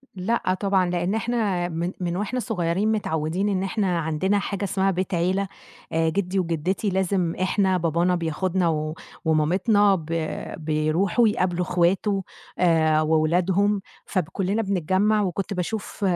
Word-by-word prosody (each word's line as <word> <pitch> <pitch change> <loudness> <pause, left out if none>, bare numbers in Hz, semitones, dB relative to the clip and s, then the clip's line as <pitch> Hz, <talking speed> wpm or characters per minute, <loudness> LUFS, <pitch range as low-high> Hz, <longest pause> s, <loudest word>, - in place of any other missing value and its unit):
لأ 185 0 0
طبعًا، 195 -3 +2
لإن 175 +4 0
إحنا 210 -7 0
من 170 +2 -2
من 175 0 -2
وإحنا 215 +5 -2
صغيّرين 200 -2 0
متعوّدين 180 -1 -1
إن 190 -1 0
إحنا 190 -3 0
عندنا 165 +6 0
حاجة 200 0 -3
اسمها 195 0 +1
بيت 185 +1 -2
عيلة 185 +3 +1 0.5
آآ 165 0 +2
جدّي 190 +1 -1
وجدّتي 180 +4 -1
لازم 185 -2 0
إحنا 190 0 +2
بابانا 170 +2 +1
بياخدنا 175 +2 0
و 155 0 -1 0.3
ومامتنا 190 +6 +3
ب 160 -4 -6 0.5
بيروحوا 160 +8 +1
يقابلوا 180 -3 0
إخواته 190 +3 +1 0.4
آآ 160 -3 +3
وولادهم 180 +6 +2 0.2
فب 185 -4 0
كلّنا 200 +3 0
بنتجمّع 200 +2 +1
وكنت 195 +1 -2
باشوف 200 +3 -4
185 Hz, 135 wpm, -24 LUFS, 170-200 Hz, 0.5 s, ومامتنا